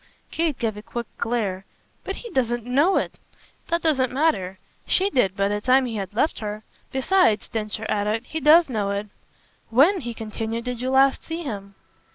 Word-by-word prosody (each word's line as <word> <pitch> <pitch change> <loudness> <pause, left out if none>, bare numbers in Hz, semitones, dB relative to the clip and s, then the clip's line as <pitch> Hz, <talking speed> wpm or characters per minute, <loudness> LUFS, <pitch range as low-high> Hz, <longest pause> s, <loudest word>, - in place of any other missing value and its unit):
Kate 320 -5 0
gave 220 -3 -1
a 210 - -8
quick 235 +2 -5
glare. 210 -5 -1 0.4
"But 390 - -4
he 470 - -9
doesn't 240 -2 0
know 285 +10 +3
it!" - - -2 0.5
"That 340 0 -1
doesn't 270 -6 +2
matter. 255 - 0 0.3
SHE 390 +2 +2
did 195 - +1
by 195 0 +2
the 205 +1 -1
time 260 +3 +4
he 230 -3 -4
had 195 -2 -4
left 300 - +1
her. 210 0 -5 0.3
Besides," 265 - +2
Densher 215 0 -4
added, 215 +3 -1
"he 320 - -4
does 320 +3 +6
know 215 -6 -1
it. 200 +1 -3 0.6
When," 295 - +5
he 240 -2 -5
continued, 225 +1 -4
"did 250 -1 -4
you 255 - -1
last 270 +1 +4
see 330 +1 -5
him?" 200 -7 -6
240 Hz, 185 wpm, -24 LUFS, 210-285 Hz, 0.6 s, does